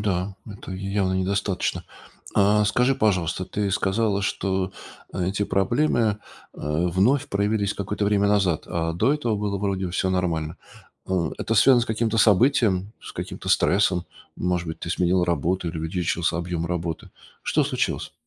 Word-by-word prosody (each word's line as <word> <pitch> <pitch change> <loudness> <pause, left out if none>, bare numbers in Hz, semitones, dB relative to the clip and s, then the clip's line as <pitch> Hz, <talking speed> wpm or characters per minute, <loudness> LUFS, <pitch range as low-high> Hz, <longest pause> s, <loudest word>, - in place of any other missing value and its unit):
да, 95 -1 -1
это 100 -2 -9
явно 95 0 -1
недостаточно. 95 0 -1 0.5
А 105 +1 +4
скажи, 125 +6 +2
пожалуйста, 95 - 0
ты 100 -1 -2
сказала, 100 +1 +1
что 95 0 -1 0.4
эти 95 +3 -1
проблемы, 120 +9 +1
э, 110 -3 +2 0.7
вновь 100 +11 +2
проявились 100 0 0
какое-то 105 +1 -3
время 100 0 +2
назад, 95 -6 +2
а 80 -1 -2
до 115 - +2
этого 120 -8 -1
было 100 -1 -2
вроде 95 -2 -1
всё 95 +1 0
нормально. 85 -4 -1 0.5
Э, 90 -4 0
это 115 - -1
связано 120 +3 +6
с 115 - -1
каким-то 110 0 0
событием, 105 -3 +3
с - - -10
каким-то - - -6
стрессом? 90 -2 +3 0.3
Может 90 -1 -1
быть, 80 - -6
ты 85 - -4
сменила 90 0 +2
работу 90 +1 0
или 80 - -5
увеличился 85 +1 -1
объем 85 -1 -2
работы? 85 -2 -4 0.3
Что - - +1
случилось? - - -2
95 Hz, 150 wpm, -24 LUFS, 90-105 Hz, 0.7 s, связано